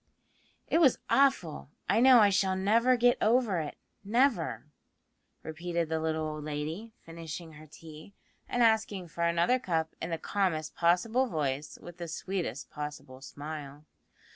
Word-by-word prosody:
"It 330 - +2
was 275 -7 +5
awful. 265 - +2 0.2
I - - +3
know 250 -1 +7
I 205 -1 +5
shall 190 -1 +2
never 230 +6 +3
get 245 +1 +3
over 225 -5 +2
it, 150 -2 -5 0.3
never," 205 - +1 0.8
repeated 170 +1 -3
the 160 0 -1
little 160 0 -1
old 155 -1 -6
lady, 155 +9 -5
finishing 165 0 -8
her 155 0 -13
tea, 155 +5 -13 0.3
and 245 - +2
asking 215 -5 +1
for 170 +1 -2
another 170 +10 +2
cup 160 -6 -2
in 165 - -3
the 165 - -2
calmest 165 -3 -1
possible 220 +10 +2
voice, 145 - -3
with 175 0 -11
the 170 -1 -6
sweetest 170 -3 -4
possible 150 -3 -7
smile. 145 0 -8
170 Hz, 145 wpm, -30 LUFS, 155-220 Hz, 0.8 s, know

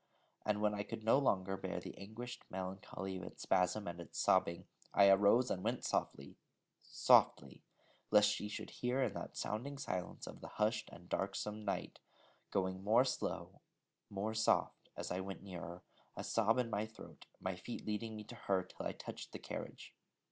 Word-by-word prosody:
And 105 -1 +2
when 105 0 +3
I 100 - -1
could 105 +2 -6
no 115 +5 +6
longer 95 -8 +2
bear - - -3
the - - -8
anguished 115 +5 -7
melancholy 95 0 -4
of 90 - -7
its - - -8
spasm 95 +2 +2
and 85 0 -4
its 85 - -10
sobbing, 85 0 +3 0.3
I 100 -1 +8
arose 100 +6 +6
and 95 - -1
went - - -1
softly, 70 0 -1 0.4
softly, - - +4 0.5
lest 105 0 +7
she 105 - -2
should - - -5
hear 125 +2 0
in 115 -6 0
that - - -6
sounding 130 +7 -2
silence 90 -10 -3
of - - -9
the - - -7
hushed 110 +1 +1
and 90 +1 -12
darksome 105 +3 -2
night, 100 - -2 0.5
going 95 0 0
more 115 +5 +5
slow, 125 - -3 0.5
more 100 +2 -2
soft, 110 0 +2
as - - -4
I 90 - 0
went 95 +1 -5
nearer, 90 -2 -7 0.3
a - - -3
sob 115 +1 +3
in 120 -2 +1
my 105 +1 0
throat, 110 - -13
my 95 0 -2
feet 105 +6 -6
leading 110 +1 -2
me 105 - -6
to 105 - -10
her, 95 -2 +1
till 90 - -5
I - - -3
touched - - -8
the - - -3
carriage. - - -7
105 Hz, 180 wpm, -37 LUFS, 95-110 Hz, 0.5 s, I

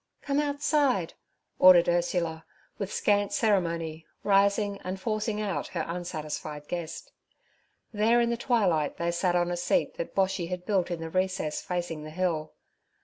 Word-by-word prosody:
'Come 280 0 0
outside' 285 - +1 0.5
ordered 180 -2 +8
Ursula, 170 -2 0 0.4
with 200 -2 -3
scant 205 -1 +1
ceremony 165 -7 0 0.2
rising 200 0 +2
and 185 +1 -4
forcing 215 +1 -2
out 195 -9 -2
her - - -3
unsatisfied 155 -3 -5
guest. 170 -2 -5 0.8
There 220 +3 +3
in 235 0 +2
the - - +1
twilight 200 - +1
they 170 0 0
sat 175 +1 +1
on 175 0 +1
a 175 - -2
seat 175 - 0
that 170 - -5
Boshy 190 -3 +1
had 180 -1 -5
built 190 -5 +1
in 170 -2 -4
the 165 0 -5
recess 185 -4 -1
facing 175 -3 -3
the 155 - -7
hill. 160 -2 -1
180 Hz, 150 wpm, -28 LUFS, 170-205 Hz, 0.8 s, ordered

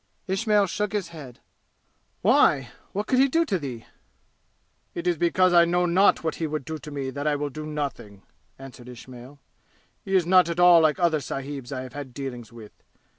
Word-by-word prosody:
Ismail 205 +1 +1
shook 210 +3 -3
his 200 -5 -2
head. 145 -7 -12 0.8
"Why? 135 -4 +3 0.2
What 205 +2 -3
could 255 - +1
he 270 - +5
do 330 +5 +1
to 195 - -1
thee?" 125 -6 -7 1.1
"It 170 - -5
is 175 -1 +2
because 175 +2 +2
I 170 -1 +7
know 175 +1 +1
not 185 +2 +3
what 160 - -1
he 160 - -2
would 150 -3 -4
do 160 -1 -6
to 150 - -10
me 140 -2 -4
that 145 +2 -4
I 150 - +2
will 145 0 -3
do 155 +2 -7
nothing!" 135 -10 -6 0.3
answered 130 -2 -12
Ismail. 125 +2 -12 0.7
"He 195 - -2
is 180 -3 +3
not 180 -1 +4
at 170 +1 -3
all 175 -1 +7
like 155 +1 +2
other 170 -4 +2
sahibs 135 -2 -6
I 130 -2 -4
have 130 - -11
had 140 -4 -8
dealings 125 -5 -7
with. 115 -3 -12
155 Hz, 195 wpm, -25 LUFS, 135-180 Hz, 1.1 s, I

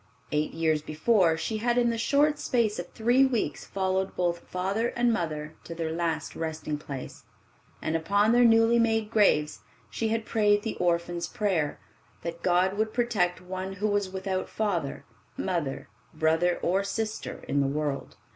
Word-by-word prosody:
Eight 150 +1 -1
years 160 -2 +1
before 165 +2 +2
she 215 +7 -2
had 240 +2 +1
in 240 -1 +3
the 230 - -2
short 290 +5 +2
space 225 -7 +1
of 175 - -6
three 240 +4 +3
weeks 235 - 0
followed 190 0 -1
both 175 -1 0
father 195 +7 -1
and 240 -1 +1
mother 155 -5 -3
to 170 - -7
their 165 -1 -2
last 165 -2 -2
resting 155 -2 -3
place, 140 -3 -8 0.6
and 160 - -1
upon 200 +7 +2
their 245 +1 +5
newly 225 0 +5
made 225 -1 +1
graves 150 - +3 0.3
she 225 - -1
had 225 0 -1
prayed 205 -2 +2
the 225 - -3
orphan's 170 0 0
prayer, 180 -8 -1 0.4
that 170 0 -5
God 185 +2 +2
would 220 0 0
protect 205 -8 +1
one 185 +1 -5
who 200 +2 -1
was 205 -2 0
without 190 0 -3
father, 180 -10 -2 0.3
mother, 170 -8 -2 0.3
brother 160 +3 +2
or 190 +3 +2
sister 215 +2 -4
in 140 - +1
the 140 - +1
world. 145 -1 -3
185 Hz, 165 wpm, -27 LUFS, 160-220 Hz, 0.6 s, their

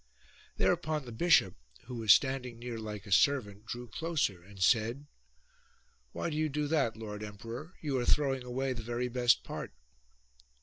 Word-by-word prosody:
Thereupon 155 -3 +1
the 120 - -8
bishop, 110 - +4 0.3
who 125 - -9
was 110 -3 +4
standing 130 -1 +3
near 120 -1 -5
like 105 -1 -6
a 100 - -10
servant, 105 -3 +2
drew 120 +1 -5
closer 150 - -1
and 95 +2 -15
said, 115 +8 +2 0.5
" - - -36
Why 170 - -3
do 150 - -3
you 155 0 +1
do 150 +1 -1
that, 140 -8 +1
lord 105 -2 -6
emperor? 115 - -8
You 140 -4 -1
are 120 - -1
throwing 135 -3 +2
away 130 +2 -2
the 115 - -6
very 120 +2 -2
best 120 0 +3
part." - - -6
120 Hz, 170 wpm, -32 LUFS, 110-140 Hz, 0.5 s, bishop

